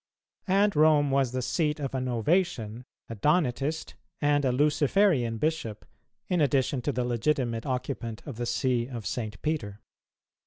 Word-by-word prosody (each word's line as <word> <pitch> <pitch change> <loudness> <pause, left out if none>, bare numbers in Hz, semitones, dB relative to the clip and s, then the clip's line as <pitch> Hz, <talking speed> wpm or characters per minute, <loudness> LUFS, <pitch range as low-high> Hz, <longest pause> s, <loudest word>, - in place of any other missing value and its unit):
And 200 +1 +3
Rome 150 -2 +4
was 135 -2 +2
the 130 0 -2
seat 150 +2 0
of 135 -2 -4
a 130 - -1
Novatian, 125 - 0 0.2
a - - -6
Donatist, 150 - 0 0.3
and 145 -1 +2
a 130 - +2
Luciferian 145 - +2
bishop, 135 -6 -2 0.4
in 180 -3 +1
addition 135 -2 +1
to 145 - -1
the 125 -2 -1
legitimate 120 -1 -1
occupant 125 -3 -3
of 140 -7 -7
the 120 0 -3
See 120 -2 0
of 120 -5 -7
St. 110 -2 -4
Peter. 115 -11 -2
135 Hz, 150 wpm, -28 LUFS, 120-150 Hz, 0.4 s, Rome